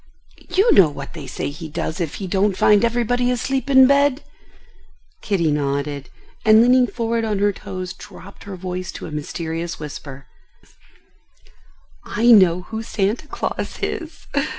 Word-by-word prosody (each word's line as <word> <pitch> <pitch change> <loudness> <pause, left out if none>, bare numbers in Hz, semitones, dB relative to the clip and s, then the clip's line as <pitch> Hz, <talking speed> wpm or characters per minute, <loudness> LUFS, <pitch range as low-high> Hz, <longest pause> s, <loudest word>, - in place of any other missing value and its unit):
You 385 +6 +3
know 180 -6 +6
what 140 -1 -8
they 150 -5 -8
say 130 - -4
he 155 +2 -8
does 160 +3 -4
if 160 -4 -3
he 195 - -5
don't 190 +1 +1
find 210 0 +4
everybody 245 +1 +1
asleep 260 +3 -1
in 265 -1 +7
bed?" 280 +1 +3 1.0
Kitty 170 -7 0
nodded, 140 -1 -2 0.3
and 220 0 +6
leaning 250 +1 +4
forward 230 -1 -2
on 215 -2 -1
her 205 +1 +2
toes, 185 -1 -6
dropped 195 +1 -13
her 200 -1 -7
voice 185 0 -5
to - - -8
a - - -8
mysterious 165 +3 -4
whisper: 140 -2 -8 1.8
"I 235 +3 +2
know 185 -5 +6
who 220 +4 -6
Santa 220 +5 -2
Claus - - -4
is." 330 -2 -5
195 Hz, 150 wpm, -21 LUFS, 165-240 Hz, 1.8 s, in